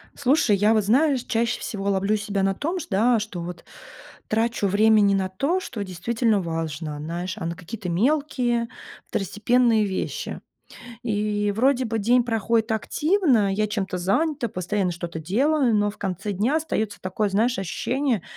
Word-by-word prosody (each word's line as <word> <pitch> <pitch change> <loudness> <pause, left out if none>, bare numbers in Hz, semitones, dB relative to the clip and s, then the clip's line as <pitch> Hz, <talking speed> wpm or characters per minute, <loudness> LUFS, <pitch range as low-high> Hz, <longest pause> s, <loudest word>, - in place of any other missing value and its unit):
Слушай, 260 -6 +3
я 210 +3 +4
вот, 215 - +2
знаешь, 265 +3 +3
чаще 230 +1 0
всего 200 -2 -3
ловлю 195 +2 +1
себя 200 -1 -2
на 195 0 +2
том, 335 - -2
шт - - -8
да, 225 +4 +3
что 205 -5 -5
вот 175 0 -7 0.6
трачу 225 -1 0
времени 205 0 +4
на 190 -1 0
то, 280 - 0
что 225 - -5
действительно 215 +4 0
важно, 160 -2 -4
знаешь, 175 +4 -4
а 185 - -5
на 170 +1 -3
какие-то 190 +2 -7
мелкие, 245 - +1 0.4
второстепенные 220 +3 +2
вещи. 205 - -4 0.6
И 210 -2 0
вроде 260 +2 +3
бы 225 -1 -2
день 240 +4 +3
проходит 225 0 0
активно, 265 - +2
я 210 +2 +1
чем-то 195 -4 -3
занята, 250 - 0
постоянно 185 0 -1
что-то 170 -1 -6
делаю, 250 - +2
но 205 0 +2
в 210 - -15
конце 195 +1 -3
дня 215 +9 0
остаётся 220 -10 -2
такое, 190 +3 -1
знаешь, 230 +6 +1
ощущение 240 - -1
215 Hz, 155 wpm, -24 LUFS, 190-240 Hz, 0.6 s, я